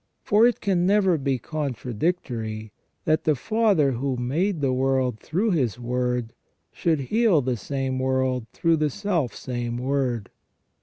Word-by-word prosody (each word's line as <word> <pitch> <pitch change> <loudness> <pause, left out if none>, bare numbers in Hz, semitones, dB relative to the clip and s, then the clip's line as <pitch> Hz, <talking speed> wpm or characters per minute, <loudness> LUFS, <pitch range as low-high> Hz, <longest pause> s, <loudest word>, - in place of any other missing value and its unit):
For 215 +3 +5
it 245 - -1
can 185 -3 +1
never 195 -3 +4
be 135 -1 0
contradictory, 120 - -3 0.3
that 155 -1 +2
the 155 - +3
Father 200 - +2
who 130 +1 -2
made 160 +10 0
the 135 -3 +1
world 130 -3 +1
through 200 +8 0
His 130 - 0
Word 125 -1 -1 0.4
should 160 -4 0
heal 215 - +3
the 125 -1 0
same 130 +3 -3
world 130 -2 0
through 165 +3 +2
the 155 -1 +1
self 165 - -1
same 120 -2 -4
Word. 125 -5 -1
135 Hz, 145 wpm, -24 LUFS, 125-170 Hz, 0.4 s, For